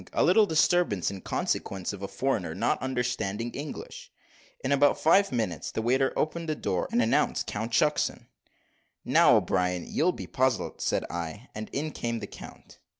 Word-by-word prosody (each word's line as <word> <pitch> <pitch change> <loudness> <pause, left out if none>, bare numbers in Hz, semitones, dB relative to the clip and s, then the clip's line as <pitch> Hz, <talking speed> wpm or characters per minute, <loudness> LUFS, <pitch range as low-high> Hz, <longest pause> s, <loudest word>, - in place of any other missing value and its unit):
a - - +2
little 215 -2 +5
disturbance 160 - +2
in 95 -1 -7
consequence 95 0 -2
of 100 - -8
a 100 - -3
foreigner 100 -5 -2
not - - 0
understanding 120 -4 -2
English." - - -8 0.5
In - - -1
about 145 +1 +4
five 195 +5 +4
minutes 105 - -2
the - - -3
waiter 130 +3 +2
opened 165 +1 -1
the 155 - 0
door, 95 -10 -1
and 120 - +3
announced 115 - +1
Count 110 +3 -4
Shucksen. 150 +6 +1 0.8
"Now, - - +6
O'Brien, 90 -1 0
you'll 180 +3 +2
be - - -7
puzzled," 130 -2 -1
said - - 0
I; 85 +8 -6
and 110 0 -6
in 150 +3 -2
came 115 -4 -3
the 105 - -5
count. - - -13
120 Hz, 165 wpm, -28 LUFS, 100-150 Hz, 0.8 s, Now